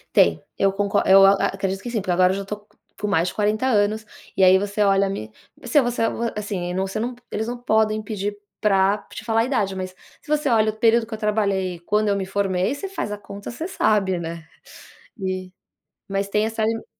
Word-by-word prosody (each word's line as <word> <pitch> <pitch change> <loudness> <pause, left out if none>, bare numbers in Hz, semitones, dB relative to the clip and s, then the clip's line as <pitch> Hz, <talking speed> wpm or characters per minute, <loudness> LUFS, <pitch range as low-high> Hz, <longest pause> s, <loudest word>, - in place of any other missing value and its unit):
Tem. 80 -1 +4 0.2
Eu 195 0 +3
conco 200 +1 0
eu 195 0 +8
a 195 - +8
a 195 - +1
acredito 195 0 -3
que 240 - -5
sim, 230 - 0
porque 185 - -8
agora 180 +1 +4
eu 190 - -2
já 200 - -5
tô 210 - -4
co 210 - -30 0.2
com 210 - -1
mais 175 -3 +2
de - - -3
40 215 +3 0
anos, 215 -2 +1 0.3
e 190 - +4
aí 185 +1 +7
você 205 +2 -4
olha 195 -1 +3
me 110 - -5 0.3
você 245 +4 +3
você 240 -2 -1 0.3
assim, 190 -4 -3
você 190 +1 -2
não 245 +2 -2 0.2
eles 220 +1 -3
não 245 +1 -4
podem 220 -2 +2
pedir 205 -1 -4 0.2
pra 195 -1 +3
te - - -8
falar 225 -1 +2
a - - +1
idade, 215 -7 0
mas 185 0 -5 0.3
se - - -19
você 300 -1 +1
olha 220 -3 +3
o - - -16
período 230 0 +4
que 225 - -10
eu - - -3
trabalhei 200 -4 0
e - - -13
quando 210 +4 +1
eu 200 - +2
me 195 -1 -2
formei, 190 +1 0
você 285 +7 -5
faz 385 - -4
a 210 - -3
conta, 200 +1 -9
você 315 +8 -5
sabe, 205 - +1
né, 165 -1 -6 0.7
e 185 -1 -3 0.6
mas 195 0 -1
tem 210 +2 +1
essa 225 0 -2
i 225 +1 -1
205 Hz, 230 wpm, -23 LUFS, 190-220 Hz, 0.7 s, eu